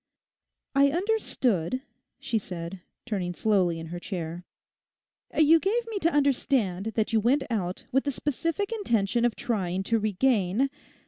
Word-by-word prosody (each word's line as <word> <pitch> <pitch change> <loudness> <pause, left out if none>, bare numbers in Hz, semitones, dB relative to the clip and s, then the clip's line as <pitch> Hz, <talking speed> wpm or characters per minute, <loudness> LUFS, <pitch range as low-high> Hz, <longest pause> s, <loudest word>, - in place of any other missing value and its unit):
'I 280 0 +5
understood,' 260 - 0 0.3
she 225 - -1
said, 180 -1 -7 0.2
turning 185 -7 -2
slowly 185 -6 +2
in 165 - -6
her 175 - -4
chair, 175 -2 -5 0.9
'you 315 +1 +6
gave 450 +7 0
me 425 -3 -2
to 335 -2 +2
understand 260 - +1
that 225 +1 0
you 225 - +5
went 260 +6 +2
out 185 -5 -2
with 270 +2 +2
the 285 - +1
specific 330 - -2
intention 235 - +1
of 240 - +1
trying 190 -5 -1
to 225 +3 +1
regain.... 215 +2 +1
230 Hz, 140 wpm, -27 LUFS, 185-280 Hz, 0.9 s, you